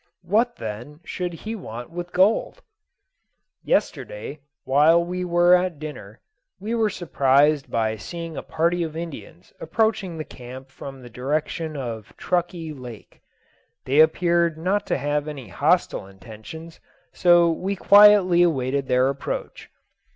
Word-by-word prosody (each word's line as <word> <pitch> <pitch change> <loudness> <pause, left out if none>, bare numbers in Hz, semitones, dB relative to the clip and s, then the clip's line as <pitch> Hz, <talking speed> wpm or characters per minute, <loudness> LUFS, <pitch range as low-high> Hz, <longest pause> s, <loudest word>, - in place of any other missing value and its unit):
What, 225 +7 +1
then, 115 +7 -7
should 180 -1 -4
he 215 +6 -7
want 120 - -8
with 175 +1 -6
gold? 210 - +1 1.0
Yesterday, - - -2 0.2
while 155 +6 +4
we 180 +1 -3
were 175 0 +4
at 180 -2 +2
dinner, 130 -9 -9 0.4
we 215 +4 -4
were 225 -2 +2
surprised 145 -4 +2
by 110 -1 -1
seeing 165 - -7
a - - -4
party 170 +2 0
of 160 -1 -4
Indians 135 - -9
approaching 200 -2 -1
the 155 - -4
camp 130 -1 -11
from 135 -1 -10
the 120 - -11
direction 150 +5 -3
of 115 -5 -7
Truckee 175 -3 -2
Lake. 125 -6 -12 0.6
They 140 +3 +2
appeared 170 +1 +3
not 195 +5 -1
to - - 0
have 145 +1 -1
any 135 -8 -7
hostile 95 - +1
intentions, 115 - -11 0.3
so 175 -1 +5
we 190 +4 -2
quietly 200 -3 +6
awaited 140 -5 +1
their 125 +1 +3
approach. 135 0 -5
160 Hz, 135 wpm, -23 LUFS, 135-175 Hz, 1.0 s, quietly